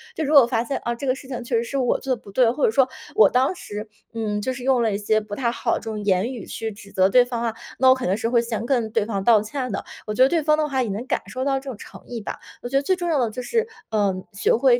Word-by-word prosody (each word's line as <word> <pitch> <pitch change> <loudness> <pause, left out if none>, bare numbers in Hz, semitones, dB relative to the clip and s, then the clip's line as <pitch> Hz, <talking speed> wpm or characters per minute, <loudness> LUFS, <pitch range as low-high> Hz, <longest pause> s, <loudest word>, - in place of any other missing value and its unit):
就 320 - -2
如 300 +1 0
果 285 - +10
我 235 - +2
发 235 -2 0
现 270 +3 -2
啊， 235 - 0
这 270 +4 -5
个 255 - +2
事 265 - -12
情 250 -2 -5
确 240 0 -2
实 230 - +1
是 275 +4 -4
我 255 -3 +1
做 265 -1 -1
得 235 - -17
不 200 - -13
对， 240 +3 +4
或 270 +4 -3
者 - - +3
说 260 +3 +4 0.3
我 210 -3 +7
当 260 +6 +2
时 210 -8 -7 0.3
嗯， 215 -2 -2
就 260 +5 -1
是 255 -1 -8
用 260 -1 +3
了 225 -3 +1
一 - - 0
些 215 +1 +1
不 210 -1 -7
太 240 -1 0
好 - - -1
的 - - -2
这 - - -17
种 210 -1 -4
言 200 +5 +1
语 240 - -7
去 225 0 -4
指 200 -1 -13
责 190 0 +3
对 245 +4 +6
方 240 -1 -4
啊， 230 -1 -1 0.3
那 260 0 +6
我 260 - +7
可 260 - -4
能 185 - +2
是 225 +1 -1
会 235 -1 +3
先 230 -1 -3
跟 240 -4 0
对 220 -1 +1
方 200 -3 -2
道 225 -1 +5
歉 250 +4 -4
的。 200 - -3 0.2
我 215 - -3
觉 255 - +5
得 265 - +5
对 330 +1 +2
方 305 0 +3
的 305 -1 +1
话 265 -2 +1
也 230 - -3
能 205 +5 -4
感 - - 0
受 255 +1 -4
到 270 0 +1
这 270 0 -8
种 245 - -6
诚 - - -12
意 235 -2 -5
吧。 - - -5 0.2
我 245 - -5
觉 270 - +2
得 - - +3
最 375 +6 +2
重 350 -1 -3
要 310 -4 +2
的 240 -3 +1
就 250 - -5
是， 455 - 0 0.2
呃， 205 -3 +1 0.2
学 200 - +2
会 245 +1 +4
240 Hz, 355 characters per minute, -23 LUFS, 215-265 Hz, 0.3 s, 果